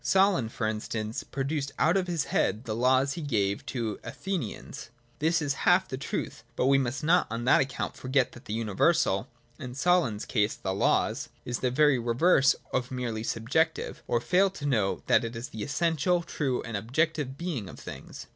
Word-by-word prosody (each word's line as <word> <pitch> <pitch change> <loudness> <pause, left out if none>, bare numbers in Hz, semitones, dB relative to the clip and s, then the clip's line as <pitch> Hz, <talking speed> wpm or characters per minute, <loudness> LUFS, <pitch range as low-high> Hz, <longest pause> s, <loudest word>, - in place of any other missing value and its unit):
Solon, 190 - +3
for 115 - -3
instance, 110 0 -3
produced 140 +1 -3
out 165 +5 +3
of 190 -2 +1
his 170 -4 0
head 105 -4 0
the 110 -3 -3
laws 130 +3 +3
he 170 - -5
gave 100 -9 0
to 115 -5 -3
the - - -7
Athenians. 150 - -5 0.3
This 160 +1 +2
is 145 -1 0
half 180 +1 +5
of - - -27
the 130 - -4
truth: 140 - -4
but - - +1
we 135 +1 +5
must 130 +3 -2
not 170 +4 +4
on 115 +2 -3
that 125 - +5
account 135 -1 -3
forget 130 0 +1
that 120 - -14
the 105 - -5
universal 115 - +2 0.3
(in 125 -1 -7
Solon's 145 -9 +2
case, 105 -2 +1
the 95 - -3
laws) 100 - +1 0.2
is 120 0 -2
the 125 - +1
very 140 0 +4
reverse 135 +5 +4 0.2
of 130 -1 0
merely 120 -4 -3
subjective, 140 +9 -1
or 120 - +2
fail 185 +10 +3
to 185 -6 -8
note 110 -9 0
that - - +4
it 115 0 -5
is 115 +3 -5
the 110 - -7
essential, 170 - +1
true, 135 -6 -2
and 115 -2 -5
objective 140 +5 -1
being 145 - -4
of - - -11
things. - - -9
130 Hz, 195 wpm, -28 LUFS, 115-160 Hz, 0.3 s, half